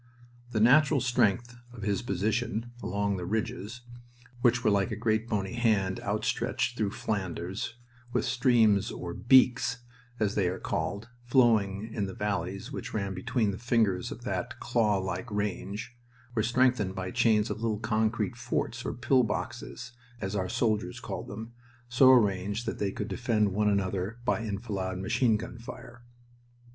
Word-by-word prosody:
The 110 Hz, -, -1 dB
natural 140 Hz, +6 st, +5 dB
strength 120 Hz, -1 st, +1 dB, 0.2 s
of 115 Hz, -3 st, -10 dB
his 100 Hz, -1 st, 0 dB
position 110 Hz, +3 st, -1 dB
along 100 Hz, +1 st, -1 dB
the 90 Hz, -, -4 dB
ridges, 110 Hz, +2 st, -3 dB, 0.6 s
which 125 Hz, 0 st, +3 dB
were -, -, +4 dB
like 100 Hz, +2 st, +2 dB
a 110 Hz, -, -3 dB
great 110 Hz, +1 st, 0 dB
bony 100 Hz, -1 st, -1 dB
hand 105 Hz, -6 st, +1 dB
outstretched 120 Hz, -, -1 dB
through 105 Hz, -4 st, 0 dB
Flanders, 100 Hz, -3 st, -3 dB, 0.4 s
with -, -, 0 dB
streams 115 Hz, -5 st, +3 dB
or 85 Hz, -1 st, -5 dB
"beeks," 125 Hz, +1 st, +4 dB, 0.4 s
as 105 Hz, -2 st, +1 dB
they 100 Hz, -4 st, +1 dB
are 95 Hz, -, -3 dB
called, 100 Hz, +4 st, -3 dB
flowing 110 Hz, -4 st, +2 dB
in 100 Hz, -2 st, -1 dB
the 95 Hz, -, -7 dB
valleys 100 Hz, +3 st, -3 dB
which 125 Hz, -3 st, -6 dB
ran 100 Hz, -2 st, -1 dB
between 110 Hz, +3 st, 0 dB
the 100 Hz, -, -7 dB
fingers 110 Hz, -6 st, +1 dB
of -, -, -8 dB
that -, -, -3 dB
clawlike 105 Hz, -4 st, 0 dB
range, 105 Hz, +3 st, -3 dB, 0.4 s
were 115 Hz, -, +1 dB
strengthened 115 Hz, -4 st, +2 dB
by 95 Hz, -1 st, -4 dB
chains 115 Hz, -3 st, +3 dB
of 110 Hz, -, -4 dB
little 110 Hz, -2 st, 0 dB
concrete 110 Hz, +2 st, 0 dB
forts 120 Hz, +1 st, -2 dB
or -, -, -3 dB
"pill 130 Hz, +1 st, +3 dB
boxes," 115 Hz, +1 st, -4 dB, 0.3 s
as 95 Hz, 0 st, -3 dB
our 95 Hz, -2 st, -1 dB
soldiers 110 Hz, -3 st, 0 dB
called -, -, -6 dB
them, 110 Hz, +3 st, -7 dB, 0.4 s
so 125 Hz, +2 st, +6 dB
arranged 105 Hz, -2 st, +2 dB
that 115 Hz, -, -3 dB
they 100 Hz, -1 st, 0 dB
could 105 Hz, -, -4 dB
defend 110 Hz, -6 st, +1 dB
one 105 Hz, +1 st, +2 dB
another 100 Hz, +1 st, -1 dB
by 125 Hz, -, +2 dB
enfilade 100 Hz, -4 st, -3 dB
machine 110 Hz, +4 st, +2 dB
gun 115 Hz, +2 st, -8 dB
fire. 115 Hz, 0 st, -10 dB
110 Hz, 155 wpm, -29 LUFS, 100-120 Hz, 0.6 s, so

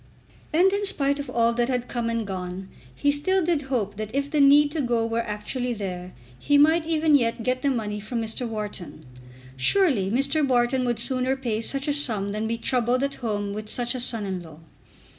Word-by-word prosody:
And 365 Hz, +5 st, +3 dB
in 405 Hz, +1 st, -1 dB
spite 285 Hz, -7 st, +1 dB
of 285 Hz, -, -5 dB
all 235 Hz, 0 st, +2 dB
that 240 Hz, +1 st, 0 dB
had 250 Hz, -1 st, -1 dB
come 235 Hz, -2 st, -2 dB
and 230 Hz, -1 st, -2 dB
gone 185 Hz, 0 st, -6 dB, 0.3 s
he 285 Hz, -, +2 dB
still 355 Hz, +5 st, +2 dB
did 335 Hz, -4 st, +1 dB
hope 210 Hz, -6 st, -2 dB
that 215 Hz, -1 st, -4 dB
if 280 Hz, +1 st, -1 dB
the 300 Hz, -, +2 dB
need 290 Hz, +1 st, +6 dB
to 315 Hz, -, -2 dB
go 240 Hz, -3 st, 0 dB
were 230 Hz, 0 st, -1 dB
actually 230 Hz, +4 st, -4 dB
there 185 Hz, -3 st, -6 dB, 0.3 s
he 290 Hz, -, +2 dB
might 315 Hz, +3 st, +4 dB
even 315 Hz, -1 st, +2 dB
yet 230 Hz, -4 st, +2 dB
get 255 Hz, +2 st, 0 dB
the 280 Hz, -, +1 dB
money 210 Hz, -5 st, -2 dB
from 225 Hz, +3 st, -4 dB
Mr. 225 Hz, +2 st, -3 dB
Wharton. 210 Hz, -8 st, -6 dB, 0.5 s
Surely 230 Hz, -, +2 dB
Mr. 275 Hz, +7 st, +1 dB
Wharton 255 Hz, -1 st, +1 dB
would 240 Hz, -2 st, 0 dB
sooner 255 Hz, +2 st, +1 dB
pay 235 Hz, -5 st, -3 dB
such 275 Hz, +5 st, -2 dB
a 290 Hz, -, +2 dB
sum 225 Hz, -9 st, +1 dB
than 215 Hz, +2 st, -3 dB
be 230 Hz, +1 st, -2 dB
troubled 250 Hz, +2 st, 0 dB
at 280 Hz, 0 st, -1 dB
home 205 Hz, -3 st, -2 dB
with 215 Hz, +1 st, -6 dB
such 240 Hz, +1 st, +1 dB
a 255 Hz, -, -4 dB
son 230 Hz, -3 st, 0 dB
in 190 Hz, -2 st, -4 dB
law. 160 Hz, -3 st, -13 dB
240 Hz, 210 wpm, -24 LUFS, 215-280 Hz, 0.5 s, need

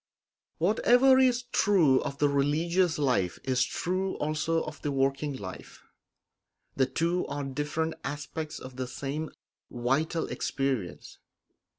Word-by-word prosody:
Whatever 245 Hz, +8 st, +5 dB
is 250 Hz, -1 st, +3 dB
true 165 Hz, -11 st, +4 dB
of 140 Hz, -, -4 dB
the 145 Hz, -, +3 dB
religious 160 Hz, +5 st, +1 dB
life 125 Hz, -11 st, +1 dB
is 130 Hz, -1 st, +1 dB
true 185 Hz, +7 st, -2 dB
also 155 Hz, +2 st, 0 dB
of 155 Hz, 0 st, -8 dB
the 145 Hz, -, -2 dB
working 135 Hz, +2 st, 0 dB
life; 95 Hz, -4 st, -9 dB, 0.9 s
the 130 Hz, -1 st, +2 dB
two 170 Hz, +5 st, 0 dB
are 145 Hz, -, -4 dB
different 150 Hz, +4 st, -2 dB
aspects 150 Hz, +2 st, -5 dB
of 130 Hz, 0 st, -10 dB
the 130 Hz, -1 st, -3 dB
same 140 Hz, +4 st, -4 dB, 0.4 s
vital 140 Hz, +7 st, 0 dB
experience. 130 Hz, -10 st, -3 dB
150 Hz, 120 wpm, -28 LUFS, 135-170 Hz, 0.9 s, Whatever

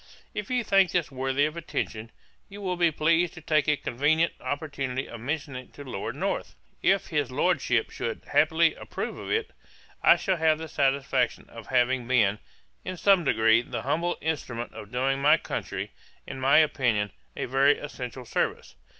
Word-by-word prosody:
'If 210 Hz, -2 st, -5 dB
you 250 Hz, -1 st, +1 dB
think 195 Hz, -3 st, +4 dB
this 175 Hz, -5 st, 0 dB
worthy 135 Hz, +2 st, +1 dB
of 155 Hz, +1 st, -3 dB
attention, 115 Hz, -8 st, -4 dB, 0.4 s
you 200 Hz, +1 st, -10 dB
will 185 Hz, -3 st, -2 dB
be 175 Hz, -1 st, +3 dB
pleased 165 Hz, +3 st, +1 dB
to 160 Hz, -, -10 dB
take 155 Hz, -1 st, +1 dB
a 150 Hz, -1 st, +3 dB
convenient 150 Hz, +7 st, +1 dB
opportunity 140 Hz, -3 st, -3 dB
of 120 Hz, -, -9 dB
mentioning 135 Hz, -1 st, -4 dB
it -, -, -27 dB
to 145 Hz, -, -9 dB
Lord 130 Hz, -, -5 dB
North. -, -, -3 dB, 0.3 s
If 195 Hz, 0 st, +2 dB
his 150 Hz, -6 st, 0 dB
Lordship 125 Hz, -4 st, +1 dB
should 115 Hz, -, -4 dB
happily 160 Hz, +3 st, +4 dB
approve -, -, -6 dB
of -, -, -7 dB
it, 445 Hz, 0 st, 0 dB, 0.5 s
I -, -, +7 dB
shall 190 Hz, -3 st, 0 dB
have 160 Hz, -1 st, +3 dB
the 160 Hz, +1 st, -6 dB
satisfaction 135 Hz, -3 st, 0 dB
of 115 Hz, -3 st, -10 dB
having 125 Hz, -1 st, +1 dB
been, 105 Hz, -5 st, +3 dB, 0.4 s
in 185 Hz, -, -5 dB
some 195 Hz, -1 st, +4 dB
degree, 110 Hz, -4 st, +4 dB
the -, -, -6 dB
humble 175 Hz, +2 st, 0 dB
instrument 130 Hz, -7 st, -3 dB
of 105 Hz, -, -10 dB
doing 135 Hz, +2 st, 0 dB
my 150 Hz, +3 st, +6 dB
country, -, -, -5 dB, 0.3 s
in 135 Hz, -, -7 dB
my 135 Hz, +3 st, +4 dB
opinion, 120 Hz, -9 st, +2 dB, 0.3 s
a -, -, -2 dB
very 135 Hz, +3 st, +3 dB
essential 125 Hz, -3 st, -7 dB
service. -, -, -2 dB
145 Hz, 175 wpm, -27 LUFS, 125-160 Hz, 0.5 s, I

